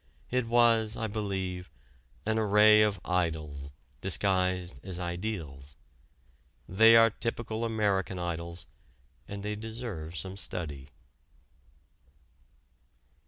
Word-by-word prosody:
It 125 -2 0
was, 115 -2 +3
I 115 - -2
believe, 95 -4 -3 0.6
an 110 +1 +1
array 105 0 +6
of 105 -3 +2
idols 80 -6 -2 0.3
disguised 90 -4 0
as 90 0 -4
ideals. 85 -7 -5 0.9
They 110 +5 +6
are 115 0 +7
typical 115 0 -3
American 105 -4 0
idols, 85 -1 -4 0.6
and 100 0 -7
they 105 0 -2
deserve 105 -7 -6
some 95 +1 -5
study. 75 -8 -4
95 Hz, 95 wpm, -29 LUFS, 85-110 Hz, 0.9 s, are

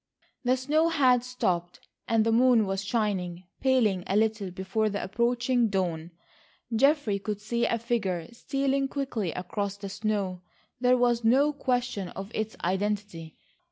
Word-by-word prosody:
The 255 +1 +2
snow 300 +5 +2
had 255 -6 +3
stopped, 180 -9 -2 0.2
and 225 -1 +3
the 225 - +2
moon 240 -1 +5
was 195 0 -2
shining, 190 -5 -1 0.2
paling 230 -9 +2
a 195 - 0
little 215 -2 +1
before 190 +4 -1
the 205 0 -3
approaching 240 +3 +1
dawn. 175 -4 -2 0.7
Geoffrey 275 -5 +3
could 210 0 -4
see 235 +3 -1
a 230 - +1
figure 205 -8 -2
stealing 275 +2 0
quickly 260 - -3
across 200 +3 -4
the 200 -1 -7
snow. 200 -3 -2 0.4
There 250 0 +4
was 240 -1 +2
no 275 +6 +4
question 245 -8 -1
of 195 +4 -8
its 220 0 -3
identity. 190 -3 -2
220 Hz, 145 wpm, -27 LUFS, 195-250 Hz, 0.7 s, moon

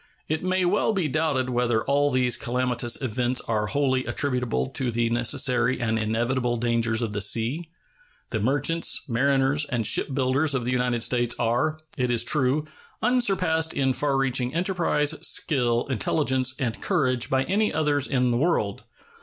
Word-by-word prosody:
It 155 +2 -2
may 185 0 +1
well 205 +4 +1
be 185 -6 0
doubted 145 -4 0
whether 120 -2 +1
all 145 +1 +2
these 125 -2 +1
calamitous 125 -1 -1
events 125 +1 -1
are 105 -2 -1
wholly 130 0 0
attributable 125 -2 -1
to 130 -2 -1
the 115 0 0
necessary 120 +1 +1
and 110 -1 0
inevitable 120 +3 -1
dangers 115 -1 0
of 110 -2 -3
the 105 - -2
sea. 120 - 0 0.6
The 110 - -1
merchants, 145 +8 +1
mariners, 135 +3 +1
and 120 -5 -2
shipbuilders 135 +4 +1
of 125 -3 -2
the 125 - -1
United 125 -2 0
States 120 0 0
are, 120 +7 0 0.2
it 125 -2 0
is 120 -1 +2
true, 135 +3 +1 0.4
unsurpassed 190 -10 +1
in 135 -2 +1
far 140 0 0
reaching 130 0 0
enterprise, 170 -4 0
skill, 120 -5 0
intelligence, 130 +1 0
and 120 -4 -3
courage 130 -10 0
by 130 0 +2
any 210 +7 0
others 145 -3 0
in 125 -2 +1
the 120 - +1
world. 125 - 0
130 Hz, 155 wpm, -25 LUFS, 120-145 Hz, 0.6 s, all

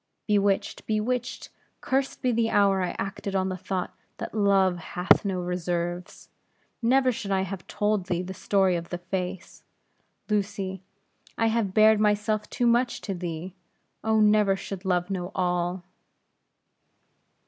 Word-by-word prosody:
"Bewitched! 200 -2 +1
bewitched! 230 +3 -2 0.3
Cursed 270 +1 -1
be 250 - +3
the 230 -1 +1
hour 200 -2 +3
I 180 - -2
acted 195 0 -4
on 190 0 +1
the 185 - -2
thought, 185 0 -3 0.2
that - - -6
Love 195 -3 +3
hath 180 +2 +2
no 190 -3 -1
reserves. 175 0 -3 0.5
Never 255 +2 +4
should 215 -4 -5
I 190 -1 +2
have 190 -1 -5
told 210 -3 0
thee 180 -1 -1
the 190 +1 -6
story 190 -1 +2
of 170 0 -4
that 175 0 -6
face, 185 -1 -4 0.6
Lucy. 200 -3 -2 0.6
I 225 0 +3
have 220 -4 0
bared 215 0 +6
myself 210 0 +1
too 245 - -1
much 240 +1 +2
to 195 - -3
thee. 175 0 -5 0.5
Oh, 220 0 +2
never 210 -2 +4
should 195 0 -7
Love 180 0 0
know 180 -1 -3
all!" 180 0 0
195 Hz, 145 wpm, -26 LUFS, 180-215 Hz, 0.6 s, bared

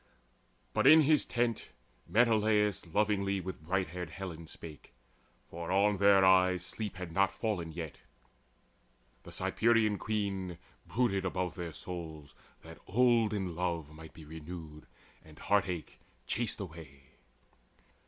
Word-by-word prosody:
But - - +3
in 155 +1 +9
his 150 -1 +3
tent 120 -2 -1 0.4
Menelaus 105 -4 +2
lovingly 100 +2 +1
With 95 -3 -6
bright 90 +2 -1
haired 90 0 -5
Helen 85 -2 -7
spake; 75 -3 -11 0.5
for 85 0 -6
on 100 +2 +3
their 100 -1 +6
eyes 95 -1 +4
Sleep 105 0 -5
had 90 -2 -6
not 95 +3 +2
fallen 95 -7 -3
yet. 80 -3 -7 1.2
The - - -12
Cyprian 110 -3 +2
Queen 100 -5 -2 0.3
Brooded 100 -4 +1
above 90 -1 -2
their 85 -2 -5
souls, 80 -4 -8 0.3
that 80 -1 -12
olden 110 -5 +2
love 85 -4 -2
Might 80 +1 -12
be 80 - -11
renewed, 80 0 -9 0.4
and 75 -1 -16
heart 100 -2 +1
ache 85 -3 -6 0.3
chased 115 0 -2
away. 80 -7 -10
95 Hz, 125 wpm, -32 LUFS, 85-105 Hz, 1.2 s, in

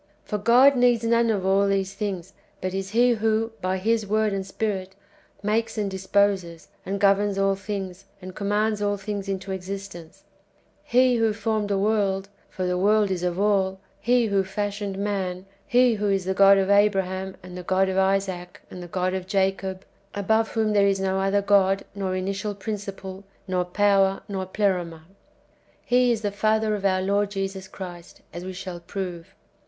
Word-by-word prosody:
For 210 - -3
God 250 +6 +6
needs 245 -2 +3
none 230 0 +3
of 200 -4 0
all 195 +1 +3
these 195 -1 0
things, 195 -3 -4 0.3
but 185 0 -3
is 195 0 -3
He 240 +4 +4
who, 225 0 +1
by 185 +1 0
His 220 +3 +1
Word 215 0 +1
and 195 -1 -2
Spirit, 190 -1 -3 0.5
makes, 225 +2 0
and 205 -2 -1
disposes, 190 -3 0
and 195 +1 -3
governs 200 0 +3
all 195 0 +2
things, 195 -1 -6
and 185 -1 -9
com 200 +1 -4
mands 210 0 +1
all 205 0 0
things 200 0 -5
into 195 0 -4
existence, 190 -3 -7 0.3
— - - -37
He 255 -1 +5
who 225 -1 +2
formed 215 -1 -1
the 200 - +1
world 195 -1 0 0.2
(for 185 - -4
the 180 0 0
world 205 +1 +3
is 180 -2 -2
of 180 0 -1
all), 195 -2 +1
— - - -37
He 245 -1 +5
who 200 -2 +1
fashioned 205 0 -3
man, 190 -2 -2
— 195 - -37
He 245 0 +4
[who]"^ 210 -1 -1
is 195 -2 0
the 190 - 0
God 195 +1 +6
of 195 0 +1
Abraham, 190 -2 +2
and 180 -1 -10
the 180 - -5
God 190 +2 +1
of 190 0 0
Isaac, 190 -2 -1
and 180 - -8
the 175 - -8
God 185 +1 -1
of 185 -1 -4
Jacob, 190 -1 -1 0.3
above 220 +3 +1
whom 220 -2 +1
there 200 -1 +4
is 195 -1 +1
no 190 0 0
other 195 +1 +1
God, 195 -1 +3
nor 195 -2 -2
initial 195 +2 -3
prin 210 +2 -4
ciple, 195 -1 -8 0.2
nor 180 -1 0
power, 195 +1 +2
nor 190 -2 -4
pleroma, 180 -5 -1 0.5
— - - -36
He 250 0 +5
is 225 -2 -1
the 205 - 0
Father 215 +1 +1
of 200 -1 -3
our 185 -1 +2
Lord 200 +1 +1
Jesus 195 -1 -4
Christ, 180 -3 -10
as 175 - -6
we 185 0 -6
shall 185 -1 -7
prove. 175 -1 -6
195 Hz, 190 wpm, -24 LUFS, 190-210 Hz, 0.5 s, God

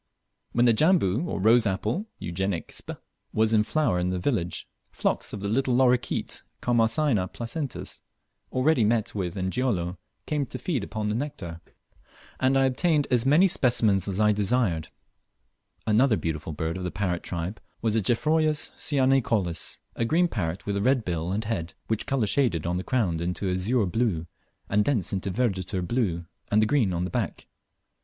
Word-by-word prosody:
When 120 +1 +3
the 120 - +6
Jambu, 155 - +3
or - - -3
rose 110 +3 +5
apple 110 - -1
(Eugenic 90 0 -3
sp.), - - -7 0.4
was 110 +1 +2
in 105 -1 +5
flower 110 -4 +1
in 90 +1 0
the 90 - -1
village, 90 -3 -1 0.2
flocks - - -2
of 105 - -6
the 100 - -2
little 125 +3 +1
lorikeet 125 -1 +1 0.2
(Charmosyna 115 -2 +2
placentis), 130 +4 -4 0.5
already 130 -1 +3
met 110 0 +1
with 95 -2 -3
in 95 0 -1
Gilolo, 95 -9 -1 0.3
came 145 -3 -1
to - - -6
feed 150 - -2
upon 105 +1 -3
the - - 0
nectar, 110 - -5 0.8
and 130 +1 +3
I 135 - +4
obtained 145 +3 +2
as 125 0 +3
many 160 +8 +6
specimens 110 - +2
as 95 0 -2
I 105 0 +5
desired. 100 -6 +1 1.0
Another 110 +1 +4
beautiful 80 -1 -3
bird 80 +3 -3
of - - -5
the 90 - -1
parrot 90 -3 -2
tribe 90 +4 -4 0.2
was 110 -2 +2
the 110 - +2
Geoffroyus 155 +7 +1
cyanicollis, 130 - +1
a - - -1
green 165 +9 +3
parrot 90 - -3
with 100 -1 -1
a - - -1
red 130 0 +2
bill 85 0 -2
and 105 +3 -1
head, 95 -6 -3
which 110 -1 -1
colour 135 -5 +1
shaded 105 - +1
on 90 +1 0
the 90 - -3
crown 95 -10 0
into 90 +3 -2
azure 105 +5 +1
blue, 95 -4 0 0.4
and 105 +1 +2
thence 115 - 0
into 95 +1 -1
verditer 95 -3 -1
blue 95 -9 0 0.2
and 105 - +3
the 110 - +4
green 110 -4 +2
of 85 0 -1
the 90 - -3
back. - - -3
110 Hz, 175 wpm, -26 LUFS, 90-130 Hz, 1.0 s, the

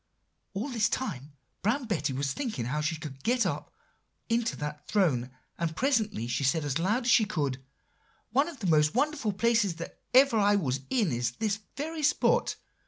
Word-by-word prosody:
"All 225 +9 -2
this 230 -3 +1
time 145 - -4 0.3
Brown 245 +7 +1
Betty 160 -10 -1
was 135 +1 -1
thinking 215 - -3
how 150 +5 -1
she 155 +2 0
could 150 -4 -9
get 245 +1 +2
up - - -3 0.6
into 230 0 +1
that 150 0 -6
throne; 145 - +2 0.3
and 165 -1 -1
presently 220 - +1
she 120 +4 -1
said 145 +3 +2
as 145 +2 -1
loud 215 +9 +1
as 250 - +3
she 225 - +6
could, 145 -11 -2 0.7
'One 275 +6 +3
of 305 -8 -11
the - - -3
most 155 -1 +3
wonderful 280 -4 +1
places 220 -3 +2
that 170 0 -8
ever 260 -4 +6
I 205 0 +4
was 135 -9 0
in 225 - +2
is 120 0 -1
this 205 - -1 0.2
very 315 +2 -3
spot. 300 - +2
200 Hz, 180 wpm, -29 LUFS, 150-235 Hz, 0.7 s, she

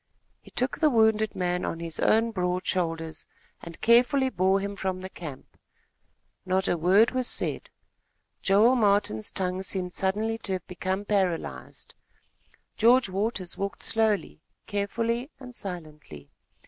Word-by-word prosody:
He - - -16
took 255 +3 -2
the 310 - +4
wounded 220 -3 +3
man 180 -1 -1
on 165 - -3
his 165 -2 -4
own 225 +1 +3
broad 180 -2 -1
shoulders, 165 -3 -2 0.3
and 170 -1 -10
carefully 250 +3 +4
bore 190 -3 +2
him 200 +1 -4
from 190 -2 -3
the 190 +1 -8
camp. 150 -6 -9 0.9
Not 190 0 0
a - - +2
word 185 +7 +4
was 255 -1 -1
said. - - -2 0.7
Joel 210 +6 +4
Martin's 200 - +2
tongue 185 -1 -2
seemed 185 -2 -3
suddenly 215 +4 -1
to 195 - -3
have 185 -2 -4
become 185 +2 -3
paralyzed. 190 -5 -2 0.8
George 240 0 +5
Waters 195 -1 -2
walked 200 0 -4
slowly, 220 -3 +1 0.2
carefully, 230 +5 -2
and 250 -2 -10
silently. 155 - -8
195 Hz, 135 wpm, -27 LUFS, 180-225 Hz, 0.9 s, George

